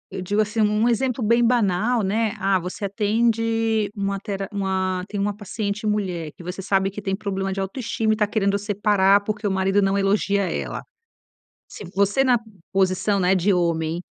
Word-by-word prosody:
eu -, -, -4 dB
digo, 205 Hz, +3 st, -1 dB
assim, 215 Hz, +1 st, -1 dB
um 210 Hz, +2 st, +2 dB
exemplo 245 Hz, +1 st, 0 dB
bem 235 Hz, +3 st, +3 dB
banal, 230 Hz, 0 st, +2 dB
né. 215 Hz, +2 st, 0 dB
Ah, 195 Hz, 0 st, +1 dB
você 180 Hz, +4 st, -5 dB
atende 225 Hz, +1 st, +1 dB
uma 200 Hz, -1 st, -2 dB
tera 195 Hz, -1 st, -4 dB
uma 190 Hz, -2 st, -1 dB
tem 205 Hz, -, -4 dB
uma 200 Hz, 0 st, -1 dB
paciente 210 Hz, 0 st, -4 dB
mulher 180 Hz, -7 st, -2 dB
que 175 Hz, -, -11 dB
você 180 Hz, +2 st, -5 dB
sabe 195 Hz, 0 st, +1 dB
que 210 Hz, -, -7 dB
tem 195 Hz, -1 st, -1 dB
problema 195 Hz, -1 st, -3 dB
de 195 Hz, -, -3 dB
autoestima 220 Hz, +2 st, -1 dB
e -, -, 0 dB
tá 210 Hz, -1 st, +1 dB
querendo 200 Hz, -2 st, +1 dB
separar, 205 Hz, -1 st, +3 dB
porque 215 Hz, +1 st, -3 dB
o -, -, 0 dB
marido 190 Hz, +1 st, +2 dB
não 195 Hz, 0 st, +1 dB
elogia 200 Hz, 0 st, +1 dB
ela. -, -, -4 dB, 0.9 s
Se -, -, -10 dB
você 200 Hz, +7 st, +2 dB
na 250 Hz, -2 st, +4 dB, 0.3 s
posição, 195 Hz, +1 st, +1 dB
né, 185 Hz, +1 st, +3 dB
de 190 Hz, +2 st, +2 dB
homem 170 Hz, -1 st, 0 dB
200 Hz, 180 wpm, -23 LUFS, 190-215 Hz, 0.9 s, na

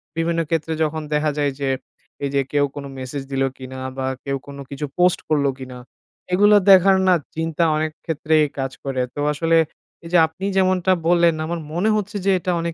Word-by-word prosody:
বিভিন্ন 165 Hz, 0 st, 0 dB
ক্ষেত্রে 160 Hz, -1 st, -1 dB
যখন 155 Hz, +1 st, -2 dB
দেখা 150 Hz, 0 st, +1 dB
যায় 145 Hz, -1 st, +1 dB
যে, 135 Hz, -1 st, -1 dB, 0.5 s
এই 140 Hz, -, 0 dB
যে 140 Hz, -, +4 dB
কেউ 145 Hz, -1 st, +3 dB
কোনো 140 Hz, -1 st, -6 dB
message 130 Hz, +1 st, -5 dB
দিলো 135 Hz, 0 st, +1 dB
কিনা? 130 Hz, 0 st, -8 dB, 0.2 s
বা 130 Hz, -, -2 dB, 0.2 s
কেউ 140 Hz, -1 st, -1 dB
কোনো 140 Hz, 0 st, -8 dB
কিছু 140 Hz, +1 st, -4 dB
post 180 Hz, 0 st, +3 dB
করলো 145 Hz, -3 st, +2 dB
কিনা? 130 Hz, -1 st, -8 dB, 0.6 s
এগুলো 205 Hz, +2 st, +6 dB, 0.2 s
দেখার 190 Hz, +1 st, +7 dB
না 185 Hz, -, +6 dB, 0.2 s
চিন্তা 165 Hz, +1 st, -1 dB
অনেক 155 Hz, 0 st, -1 dB
ক্ষেত্রেই 155 Hz, -1 st, +2 dB
কাজ 135 Hz, 0 st, -2 dB
করে। 135 Hz, -2 st, -2 dB
তো -, -, -5 dB
আসলে, 165 Hz, +2 st, +2 dB, 0.5 s
এই -, -, -7 dB
যে -, -, +6 dB
আপনি 170 Hz, +5 st, -7 dB
যেমনটা 185 Hz, -1 st, +2 dB, 0.2 s
বললেন 170 Hz, -2 st, +4 dB
আমার 170 Hz, +1 st, -3 dB
মনে 185 Hz, +6 st, +1 dB
হচ্ছে 210 Hz, +1 st, -3 dB
যে 195 Hz, -, +4 dB
এটা 180 Hz, -, -2 dB
অনেক 170 Hz, 0 st, -3 dB
160 Hz, 195 wpm, -21 LUFS, 140-175 Hz, 0.6 s, দেখার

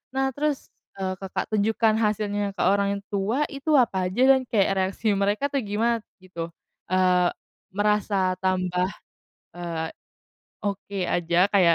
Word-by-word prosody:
nah, 270 Hz, 0 st, +1 dB
terus, 295 Hz, 0 st, -2 dB, 0.3 s
eee, 190 Hz, -1 st, -2 dB
Kakak 195 Hz, +2 st, -4 dB
tunjukkan 215 Hz, +1 st, +2 dB
hasilnya 205 Hz, -2 st, 0 dB
ke -, -, -3 dB
orang 200 Hz, 0 st, +2 dB
tua 205 Hz, +8 st, +1 dB
itu 295 Hz, +2 st, 0 dB
apa 195 Hz, -8 st, +3 dB
aja, 195 Hz, +8 st, -2 dB
dan 265 Hz, -1 st, +4 dB
kayak 205 Hz, -4 st, +2 dB
reaksi 190 Hz, +3 st, 0 dB
mereka, 200 Hz, +5 st, 0 dB
tuh, 275 Hz, -2 st, 0 dB
gimana, 225 Hz, +3 st, 0 dB, 0.2 s
gitu? 170 Hz, -3 st, -5 dB, 0.4 s
Eee, 180 Hz, -1 st, +3 dB, 0.5 s
merasa 205 Hz, -2 st, +2 dB
tambah, 185 Hz, -1 st, +1 dB, 0.7 s
eee, 165 Hz, -2 st, -3 dB, 0.7 s
oke 200 Hz, -1 st, -4 dB
aja, 170 Hz, 0 st, 0 dB
kayak 180 Hz, -5 st, +5 dB
200 Hz, 135 wpm, -25 LUFS, 185-220 Hz, 0.7 s, kayak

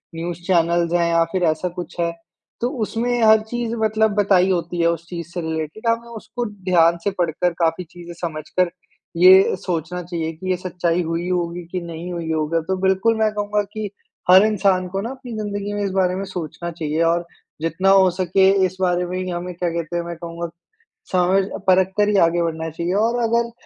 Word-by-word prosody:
News 170 Hz, 0 st, -4 dB
channels 170 Hz, -1 st, +2 dB
हैं 170 Hz, -1 st, +2 dB
या 165 Hz, 0 st, +4 dB
फिर 185 Hz, -1 st, 0 dB
ऐसा 160 Hz, +3 st, -4 dB
कुछ 175 Hz, 0 st, -8 dB
है 170 Hz, 0 st, +1 dB, 0.5 s
तो 240 Hz, -, +1 dB
उसमें 240 Hz, +3 st, -1 dB
हर 220 Hz, 0 st, +6 dB
चीज़ 240 Hz, -1 st, -2 dB
मतलब 220 Hz, 0 st, +2 dB
बताई 195 Hz, -3 st, +3 dB
होती 175 Hz, -1 st, -2 dB
है 170 Hz, -, +4 dB
उस 170 Hz, 0 st, -3 dB
चीज़ 170 Hz, -3 st, -6 dB
से 175 Hz, -, -3 dB
रिलेटेड 160 Hz, +7 st, -4 dB
हमें 230 Hz, +1 st, 0 dB
उसको 235 Hz, +1 st, -5 dB
ध्यान 180 Hz, -5 st, +2 dB
से 200 Hz, -, +1 dB
पढ़कर, 175 Hz, -1 st, 0 dB
काफ़ी 165 Hz, +1 st, 0 dB
चीज़ें 175 Hz, 0 st, -11 dB
समझकर 170 Hz, +2 st, -1 dB, 0.5 s
ये 185 Hz, +3 st, +7 dB
सोचना 180 Hz, 0 st, -3 dB
चाहिए 165 Hz, -2 st, -3 dB
कि 185 Hz, +4 st, -7 dB
ये 185 Hz, -, +1 dB
सच्चाई 175 Hz, -1 st, -1 dB
हुई 165 Hz, +1 st, -2 dB
होगी 175 Hz, -1 st, -2 dB
कि 185 Hz, -, -2 dB
नहीं 170 Hz, +1 st, -7 dB
हुई 165 Hz, -2 st, -3 dB
होगा। 160 Hz, +1 st, 0 dB
तो 190 Hz, -, +1 dB
बिल्कुल 190 Hz, +4 st, +2 dB
मैं 215 Hz, -1 st, +3 dB
कहूँगा 205 Hz, 0 st, 0 dB
कि 215 Hz, -1 st, -4 dB, 0.4 s
हर 190 Hz, +3 st, +8 dB
इंसान 195 Hz, -3 st, +2 dB
को 195 Hz, +2 st, -3 dB
ना 230 Hz, -, -4 dB
अपनी 260 Hz, -2 st, -9 dB
ज़िन्दगी 205 Hz, -1 st, -3 dB
में 205 Hz, 0 st, -2 dB
इस -, -, -1 dB
बारे 185 Hz, -1 st, +1 dB
में 195 Hz, -, -3 dB
सोचना 170 Hz, -1 st, -5 dB
चाहिए 160 Hz, -1 st, -2 dB
और 170 Hz, +1 st, +1 dB, 0.4 s
जितना 165 Hz, +4 st, +1 dB
हो 195 Hz, -1 st, +6 dB
सके 185 Hz, +1 st, +3 dB, 0.2 s
इस 185 Hz, 0 st, -4 dB
बारे 180 Hz, -1 st, +1 dB
में 180 Hz, +1 st, -4 dB
ही 185 Hz, 0 st, -3 dB
हमें 175 Hz, +1 st, -4 dB
क्या 175 Hz, 0 st, -1 dB
कहते 170 Hz, 0 st, -4 dB
हैं 170 Hz, -, -1 dB
मैं 170 Hz, 0 st, -5 dB
कहूँगा 170 Hz, 0 st, -6 dB, 0.6 s
समझ 185 Hz, +2 st, +3 dB, 0.2 s
परख 185 Hz, 0 st, +4 dB
कर 210 Hz, 0 st, +3 dB
ही 210 Hz, -, +2 dB
आगे 170 Hz, +1 st, +1 dB
बढ़ना 160 Hz, -1 st, -3 dB
चाहिए। 170 Hz, +3 st, -3 dB
और 235 Hz, +1 st, 0 dB
अगर 235 Hz, +1 st, +1 dB
180 Hz, 205 wpm, -21 LUFS, 170-195 Hz, 0.6 s, हर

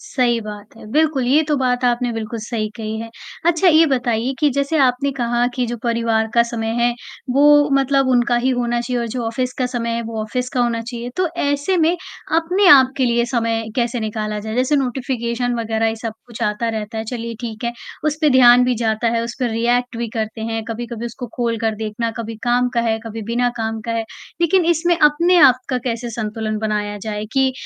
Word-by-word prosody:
सही 240 Hz, -3 st, 0 dB
बात 210 Hz, -1 st, -9 dB
है, -, -, -12 dB
बिल्कुल 305 Hz, -2 st, +2 dB
ये 285 Hz, +5 st, +4 dB
तो 300 Hz, -, +2 dB
बात 250 Hz, -1 st, 0 dB
आपने 245 Hz, 0 st, +1 dB
बिल्कुल 225 Hz, 0 st, -4 dB
सही 215 Hz, -1 st, -3 dB
कही 220 Hz, -1 st, -4 dB
है। 230 Hz, 0 st, -7 dB, 0.4 s
अच्छा, 345 Hz, +2 st, +4 dB
ये 325 Hz, 0 st, +6 dB
बताइए 245 Hz, -2 st, 0 dB
कि 300 Hz, -2 st, +3 dB
जैसे 280 Hz, +4 st, 0 dB
आपने 265 Hz, +1 st, +2 dB
कहा 240 Hz, 0 st, +1 dB
कि 250 Hz, -2 st, -1 dB
जो 240 Hz, +1 st, -4 dB
परिवार 230 Hz, -2 st, +1 dB
का 235 Hz, -, +6 dB
समय 235 Hz, -1 st, -4 dB
है, 240 Hz, 0 st, +3 dB, 0.4 s
वो 290 Hz, +2 st, +5 dB
मतलब 275 Hz, 0 st, +2 dB
उनका 245 Hz, -1 st, +3 dB
ही 260 Hz, -, +3 dB
होना 240 Hz, -1 st, 0 dB
चाहिए 245 Hz, 0 st, -2 dB
और 235 Hz, -, -2 dB
जो 245 Hz, +2 st, -3 dB
ऑफ़िस 250 Hz, +2 st, -2 dB
का 255 Hz, -, +1 dB
समय 240 Hz, -2 st, -3 dB
है, 235 Hz, -, -2 dB
वो 225 Hz, -1 st, -5 dB
ऑफ़िस 250 Hz, +3 st, -3 dB
का 250 Hz, -, +1 dB
होना 235 Hz, -1 st, +1 dB
चाहिए। 240 Hz, +1 st, -6 dB
तो 365 Hz, -1 st, +1 dB
ऐसे 285 Hz, +6 st, 0 dB
में 335 Hz, +1 st, +3 dB, 0.4 s
अपने 355 Hz, +5 st, +2 dB
आप 265 Hz, -5 st, +7 dB
के 265 Hz, -, +2 dB
लिए 235 Hz, -1 st, +2 dB
समय 230 Hz, -2 st, 0 dB
कैसे 240 Hz, -1 st, 0 dB
निकाला 215 Hz, -1 st, -3 dB
जाए? 220 Hz, +1 st, -5 dB
जैसे 255 Hz, +4 st, +2 dB
नोटिफ़िकेशन 245 Hz, -2 st, -1 dB
वग़ैरह 225 Hz, 0 st, 0 dB
ये 225 Hz, -, -3 dB
सब 225 Hz, 0 st, -5 dB
कुछ 235 Hz, -2 st, -8 dB
आता 210 Hz, +2 st, 0 dB
रहता 220 Hz, 0 st, -4 dB
है, 220 Hz, -, -3 dB
चलिए 230 Hz, 0 st, -5 dB
ठीक 230 Hz, -1 st, -6 dB
है, 235 Hz, -, -1 dB, 0.3 s
उस 305 Hz, -1 st, +1 dB
पे 305 Hz, -2 st, +4 dB
ध्यान 250 Hz, -1 st, +7 dB
भी 250 Hz, 0 st, +1 dB
जाता 220 Hz, +1 st, +1 dB
है, 230 Hz, -, 0 dB
उस 235 Hz, 0 st, -5 dB
पे 255 Hz, -, 0 dB
रिएक्ट 240 Hz, +2 st, 0 dB
भी 235 Hz, 0 st, -3 dB
करते 220 Hz, 0 st, -3 dB
हैं, 225 Hz, 0 st, -2 dB
कभी-कभी 235 Hz, 0 st, -5 dB
उसको 245 Hz, +2 st, -7 dB
खोल 235 Hz, -2 st, 0 dB
कर 220 Hz, 0 st, 0 dB
देखना, 220 Hz, +2 st, -3 dB
कभी 225 Hz, -1 st, -5 dB
काम 245 Hz, +1 st, +2 dB
का 235 Hz, -, +2 dB
है, 225 Hz, -1 st, 0 dB
कभी 225 Hz, 0 st, -6 dB
बिना 245 Hz, +1 st, +2 dB
काम 225 Hz, -1 st, -3 dB
का 230 Hz, -, -1 dB
है। 230 Hz, -1 st, -1 dB, 0.4 s
लेकिन 345 Hz, +2 st, +3 dB
इसमें 345 Hz, +1 st, +2 dB
अपने 335 Hz, +4 st, +4 dB
आप 265 Hz, -5 st, +7 dB
का 255 Hz, -, 0 dB
कैसे 235 Hz, -1 st, -3 dB
संतुलन 215 Hz, -1 st, -3 dB
बनाया 210 Hz, -1 st, -2 dB
जाए, 210 Hz, 0 st, -4 dB
कि 265 Hz, -1 st, +2 dB
240 Hz, 220 wpm, -19 LUFS, 225-260 Hz, 0.4 s, आप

